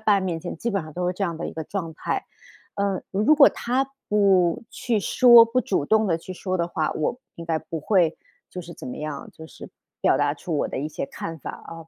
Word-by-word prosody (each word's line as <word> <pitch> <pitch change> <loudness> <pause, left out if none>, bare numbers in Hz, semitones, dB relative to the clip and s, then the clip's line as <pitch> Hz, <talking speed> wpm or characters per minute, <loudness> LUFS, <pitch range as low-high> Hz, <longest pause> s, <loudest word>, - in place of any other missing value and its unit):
爸 210 -2 +3
面 180 -4 -2
前 - - -6
基 235 - -2
本 195 -4 -1
上 155 0 -10
都 180 +3 -2
是 180 - +1
这 185 - -5
样 170 -4 -1
的 165 - -4
一 - - -6
个 160 - -5
状 165 -1 -5
态。 - - -3 0.6
嗯， 200 -2 0
如 215 +10 +4
果 290 -2 +8
她 260 +3 -1 0.2
不 195 -4 +3
去 230 -4 -1
说 240 +2 +7
不 230 +2 0
主 190 - -1
动 220 +6 +3
地 170 -4 +1
去 170 +3 -9
说 185 0 -3
的 170 -1 -1
话， 160 -2 -1
我 155 +10 -2 0.2
应 170 - -8
该 165 -1 0
不 160 0 -6
会 170 -1 +2 0.3
就 180 - -7
是 170 0 -10
怎 - - -10
么 - - -6
样， 150 -2 -5
就 160 - -12
是 - - -11 0.3
表 - - +3
达 - - +1
出 - - -4
我 - - 0
的 - - -4
一 150 - -3
些 155 - -4
看 165 +4 -7
法 - - -5
啊。 - - -11
180 Hz, 265 characters per minute, -24 LUFS, 165-210 Hz, 0.6 s, 果